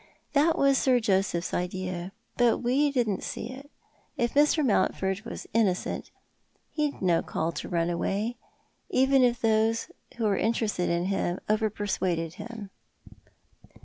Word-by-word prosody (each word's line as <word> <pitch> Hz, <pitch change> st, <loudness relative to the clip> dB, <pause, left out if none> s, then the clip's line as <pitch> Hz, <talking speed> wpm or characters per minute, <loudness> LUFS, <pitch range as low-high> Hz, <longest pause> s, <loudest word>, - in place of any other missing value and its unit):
That 310 Hz, +3 st, +3 dB
was 275 Hz, -1 st, +4 dB
Sir 255 Hz, -2 st, +3 dB
Joseph's 190 Hz, -5 st, 0 dB
idea, 180 Hz, 0 st, -3 dB, 0.2 s
but 240 Hz, -2 st, +3 dB
we 270 Hz, +5 st, +2 dB
didn't 240 Hz, -8 st, 0 dB
see 235 Hz, -, -5 dB
it. 275 Hz, +2 st, -11 dB, 0.5 s
If 235 Hz, -1 st, 0 dB
Mr. 295 Hz, +1 st, +4 dB
Mountford 195 Hz, -3 st, +1 dB
was 235 Hz, -, -7 dB
innocent 205 Hz, -5 st, 0 dB, 0.6 s
he'd 295 Hz, -8 st, -2 dB
no 170 Hz, -3 st, +3 dB
call 165 Hz, +1 st, -2 dB
to -, -, -6 dB
run 170 Hz, 0 st, 0 dB
away 205 Hz, +7 st, -1 dB, 0.3 s
— -, -, -43 dB
even 265 Hz, 0 st, +4 dB
if 240 Hz, -1 st, +2 dB
those 225 Hz, 0 st, +1 dB, 0.3 s
who 235 Hz, -, -2 dB
were 205 Hz, -3 st, +2 dB
interested 215 Hz, -4 st, 0 dB
in 170 Hz, +1 st, 0 dB
him 185 Hz, -2 st, -1 dB
over 215 Hz, +1 st, +2 dB
persuaded 180 Hz, -5 st, -2 dB
him." 215 Hz, -2 st, -8 dB
220 Hz, 145 wpm, -27 LUFS, 185-245 Hz, 0.6 s, was